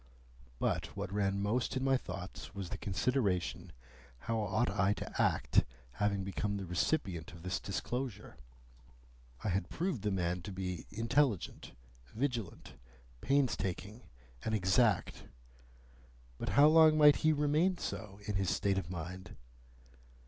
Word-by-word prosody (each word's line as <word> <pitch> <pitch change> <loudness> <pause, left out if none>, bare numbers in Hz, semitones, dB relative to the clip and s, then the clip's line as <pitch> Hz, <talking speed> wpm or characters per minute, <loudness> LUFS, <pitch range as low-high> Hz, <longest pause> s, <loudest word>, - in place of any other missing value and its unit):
But - - 0
what 100 -1 -4
ran 100 -1 +1
most 120 +5 0
in 130 - -1
my 135 0 +3
thoughts 95 -4 -6
was 95 -3 -5
the - - -3
consideration 95 -5 0 0.5
how 115 -1 -1
ought 110 +3 +1
I 100 0 +2
to - - -4
act, 60 0 +3 0.3
having 100 +5 0
become 100 +1 -2
the 95 - -5
recipient 90 - -1
of 85 -1 -12
this 90 0 -2
disclosure? 120 +3 -4 1.1
I - - 0
had 95 -1 -1
proved 175 - -2
the 105 - 0
man 90 -2 -1
to 100 - -7
be 90 -2 -4
intelligent, 115 - 0 0.4
vigilant, 120 -6 -3 0.5
painstaking, 110 -6 0 0.4
and 110 - 0
exact; 105 +3 +2 1.1
but - - -3
how 145 - +9
long 155 0 +7
might 150 -1 +7
he 155 - +3
remain 155 +5 +2
so, 105 - -5
in 105 -2 -1
his 95 -2 0
state 100 -1 +1
of 85 - -7
mind? 90 +2 -6
100 Hz, 135 wpm, -33 LUFS, 95-125 Hz, 1.1 s, how